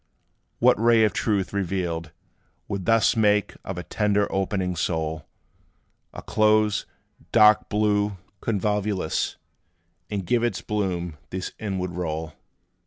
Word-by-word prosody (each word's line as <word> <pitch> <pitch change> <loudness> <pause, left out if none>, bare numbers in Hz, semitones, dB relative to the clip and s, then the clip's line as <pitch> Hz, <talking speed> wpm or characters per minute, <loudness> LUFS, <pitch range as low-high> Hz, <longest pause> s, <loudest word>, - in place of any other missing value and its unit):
What - - +4
ray 115 -1 +5
of 105 - +2
truth, 100 -4 0
revealed, 85 -4 -2 0.6
would 100 -2 -4
thus 115 0 +4
Make 105 -2 +2
of 95 - -5
a 90 - -4
tender 105 0 +1
opening 95 -2 -1
soul 80 -2 -2 0.8
A - - -9
close, 110 -1 +2 0.4
dark 105 -2 +5
blue 105 -1 +1 0.2
convolvulus, 105 -4 -1 0.7
And 100 -3 -3
give 120 +4 +1
its 120 - -1
bloom 90 -6 -2
this 95 0 -4
inward 95 -4 -3
roll? 80 -2 -4
100 Hz, 115 wpm, -25 LUFS, 90-105 Hz, 0.8 s, ray